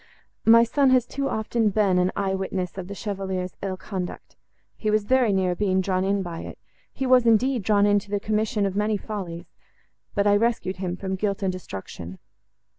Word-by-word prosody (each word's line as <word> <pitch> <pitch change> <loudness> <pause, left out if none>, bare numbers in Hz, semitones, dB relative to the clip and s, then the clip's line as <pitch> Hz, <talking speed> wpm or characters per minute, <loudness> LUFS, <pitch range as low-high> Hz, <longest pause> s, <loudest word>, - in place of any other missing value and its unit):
My 230 +1 +8
son 270 +4 +2
has 255 -2 +4
too 275 +2 -3
often 220 0 0
been 195 -3 +2
an 180 +1 +2
eye 195 -1 0
witness 190 -2 -3
of 190 -2 -6
the 200 - -7
Chevalier's 190 -3 -4
ill 190 -1 -3
conduct; 185 -2 -6 0.4
he 215 - -2
was 215 0 +2
very 250 0 +3
near 190 -2 +1
being 190 0 +1
drawn 185 0 0
in 195 0 +1
by 170 -2 -6
it; - - -8 0.3
he 270 - -3
was, 250 -2 +5
indeed, 240 +2 +3
drawn 205 +1 +3
in 205 0 +4
to 200 - -15
the 205 0 0
commission 215 0 0
of 195 -1 -2
many 210 +1 +1
follies, 185 -5 -7 0.6
but 200 -1 +2
I 205 0 +5
rescued 220 -4 0
him 180 -1 -3
from 190 0 -4
guilt 200 +1 -2
and 190 - +1
destruction. 95 - -8
200 Hz, 195 wpm, -24 LUFS, 185-220 Hz, 0.6 s, My